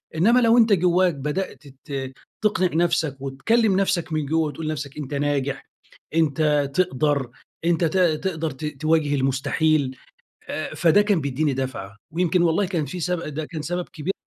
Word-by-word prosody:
إنّما 230 +10 +4
لو 230 0 +4
أنت 225 -3 +5
جوّاك 180 0 +3
بدأت 150 +1 -4 0.2
ت 135 -2 -4 0.3
تقنع 195 -4 +1
نفسك، 145 -5 0
وتكلّم 200 - +1
نفسك 185 -4 0
من 155 -1 0
جوّه، 160 +2 +1
وتقول 150 +2 -5
لنفسك 145 -2 -4
أنت 145 -1 -6
ناجح، 140 -1 -1 0.5
أنت 150 -2 +2
تقدر، 145 -6 +1 0.4
أنت 170 0 +2
ت 165 +4 0
تقدر 165 -2 +1
ت 135 +4 -7 0.2
تواجه 155 -2 +2
المستحيل، 135 +1 +1 0.8
فده 175 +5 +5
كان 205 -4 +1
بيديني 140 +1 0
دفعة 125 -7 -5 0.2
ويمكن 175 +1 +2
والله 175 +4 +2
كان 170 -6 -2
في 180 +7 -6
سب 180 +1 -1
ده 155 - -3
كان 155 0 -6
سبب 175 +3 -3
كبير 180 +2 -3
155 Hz, 155 wpm, -23 LUFS, 140-180 Hz, 0.8 s, أنت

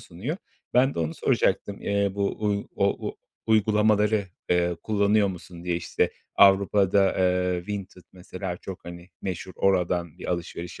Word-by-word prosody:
sunuyor. 105 - -5 0.4
Ben 130 +2 +4
de - - -5
onu 80 0 -1
soracaktım; 100 -1 0
eee, 100 0 +1
bu, 100 0 0
uuu, 105 -1 -2
o 100 0 0
u - - -8 0.3
uygulamaları, 105 -1 +3 0.3
eee, 90 0 +2
kullanıyor 105 -1 +2
musun 90 -1 -9
diye, 90 -1 0
işte, 85 - 0 0.3
Avrupa'da, 100 0 +5
eee, 90 -1 +1
Vinted 100 -3 -6
mesela 90 0 -6
çok, 95 +1 -9
hani, 85 0 -9
meşhur. 95 0 -4
Oradan 90 -3 +1
bir - - -5
alışveriş 85 0 -5
95 Hz, 145 wpm, -26 LUFS, 90-100 Hz, 0.4 s, Avrupa'da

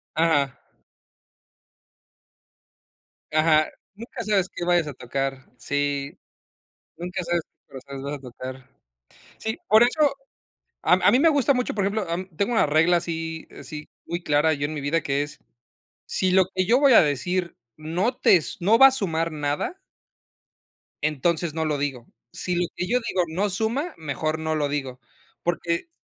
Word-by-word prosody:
Ajá. 150 -5 +2 2.7
Ajá. 155 0 +4 0.3
Nunca 230 +2 -7
sabes 200 -3 +1
que - - -5
vayas 175 -2 +2
a 145 - -5
tocar, 135 +1 -4
sí. 145 +4 -2 0.8
Nunca 180 +2 -4
sabes 170 0 0
que - - -57
corazones 135 0 -9
vas 140 +1 -3
a - - -6
tocar. 130 +1 -9 0.7
Sí, 220 +3 -3
por 220 +1 +7
eso 280 +4 +3 0.7
a - - +3
a 185 +2 +5
mí 250 - +4
me 325 +3 +5
gusta 285 -3 +3
mucho 250 -1 -1
por 200 - 0
ejemplo, 200 +1 -1 0.3
tengo 205 +4 0
una 225 - +4
regla 160 +4 +4
así 165 -1 -4
así, 150 -1 -8 0.2
muy 170 +1 -4
clara 150 +1 +3
yo 145 -1 -2
en 150 - -4
mi 150 - -4
vida 150 +4 0
que 140 -1 0
es, 145 - -10 0.7
si 185 -1 0
lo 190 0 +5
que 185 0 +1
yo 240 +7 +4
voy 280 -2 +6
a - - +9
decir 170 +5 -1 0.2
no 175 +10 -1
tes 170 -5 +3
no 210 +6 +5
va 270 - +10
a - - +3
sumar 165 -10 -1
nada, 150 - -2 1.2
entonces 155 +2 0
no 160 0 -1
lo 150 -2 0
digo. 135 -4 -3 0.2
Si 180 - -3
lo 175 0 +1
que 180 - -3
yo 250 +4 +2
digo 180 - +1
no 185 +6 -1
suma, 230 - -1
mejor 155 +1 -2
no 160 0 -1
lo 145 -2 0
digo, 135 -3 -4 0.4
porque 170 - -1
165 Hz, 160 wpm, -24 LUFS, 145-195 Hz, 2.7 s, va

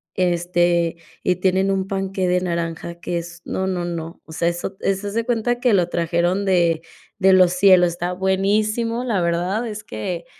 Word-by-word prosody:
este, 175 -1 +1 0.3
y 180 0 +1
tienen 190 +1 +2
un 190 0 -1
panqué 195 -1 -2
de 180 0 +2
naranja 170 -1 -3
que 175 - -2
es, 170 0 -10
no, 190 0 -2
no, 180 -2 -2
no, 165 -1 -6
o 160 - -14
sea, 170 - 0
eso 175 +3 -4
eso 195 +1 -1
haz 200 - -5
de 230 0 -1
cuenta 240 0 0
que 245 -4 +3
lo 180 -3 +3
trajeron 170 +3 0
de 170 -4 +2 0.4
de 190 0 +5
los 185 -1 +5
cielos, 180 -1 +6
está 175 +1 -3
buenísimo. 215 +5 0
La 205 -7 0
verdad 175 +7 0
es 210 -1 -6
que 170 +11 -5
180 Hz, 185 wpm, -21 LUFS, 170-195 Hz, 0.4 s, cielos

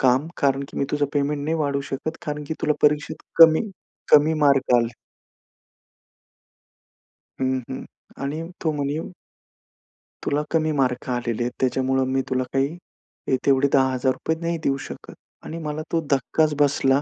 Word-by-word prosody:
काम 130 +3 +3
कारण 140 -1 +2
की - - -7
मी - - +1
तुझं 145 0 +1
पेमेंट 145 0 0
नाही 160 +2 0
वाढवू 140 -2 0
शकत 155 +4 -3
कारण 150 0 -3
की 160 - -2
तुला 150 - +3
परीक्षेत 150 +1 +2 0.2
कमी 165 +6 +7 0.4
कमी 150 +2 +6
मार्क 140 -3 +4
आले. 115 0 0 2.5
हं, 130 0 +1
हं 130 - -5 0.4
आणि 145 +3 -3 0.2
तो 160 - +1
म्हणे 145 0 -2 1.3
तुला 145 +1 +1
कमी 155 -1 +2
मार्क 125 -1 0
आलेले 120 -1 -1
आहेत. 120 - -2
त्याच्यामुळं 130 0 +1
मी 135 +1 +1
तुला 130 0 +1
काही 135 0 +2 0.6
हे 130 - +4
तेवढे 140 0 +4
₹10,000 130 +3 +1
नाही 170 0 -1
देऊ 135 0 +1
शकत - - -10 0.3
आणि 165 - -6
मला 150 +1 -3
तो 165 - +1
धक्काच 150 +3 +2
बसला 140 -1 +3
140 Hz, 150 wpm, -23 LUFS, 130-150 Hz, 2.5 s, कमी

